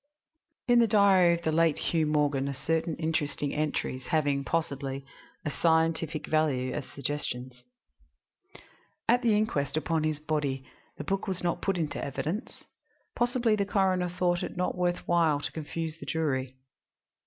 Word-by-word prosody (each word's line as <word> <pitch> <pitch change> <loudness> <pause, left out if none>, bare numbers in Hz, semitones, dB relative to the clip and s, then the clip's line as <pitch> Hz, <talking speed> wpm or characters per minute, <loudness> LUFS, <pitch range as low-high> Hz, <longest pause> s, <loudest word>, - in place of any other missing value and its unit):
IV 245 - +5
In 240 - +6
the 230 - +5
diary 195 -4 +5
of 170 - -8
the 160 - +1
late 165 -1 +3
Hugh 160 -2 0
Morgan 145 -2 +1
are 140 - -4
certain 160 +3 -1
interesting 155 -3 -1
entries 145 -4 -2
having, 145 -4 +1
possibly, 140 -2 -2 0.4
a 150 - -1
scientific 160 -1 +1
value 135 -5 +1
as - - -4
suggestions. 130 -3 -4 1.4
At 245 +2 +4
the 225 -4 +3
inquest 150 -10 0
upon 160 0 0
his 155 -1 -1
body 150 -4 -2 0.3
the - - -5
book 195 +2 -2
was 185 -2 -2
not 175 -1 0
put 195 -2 0
in 160 -3 -2
evidence; 160 - -4 0.5
possibly 240 -2 +2
the 200 - +1
coroner 190 -3 +1
thought 175 0 0
it - - -5
not 180 - 0
worth 175 -1 -1
while 165 -4 +3
to - - -4
confuse 160 0 -4
the - - -9
jury. 135 -5 -1
160 Hz, 155 wpm, -29 LUFS, 145-180 Hz, 1.4 s, In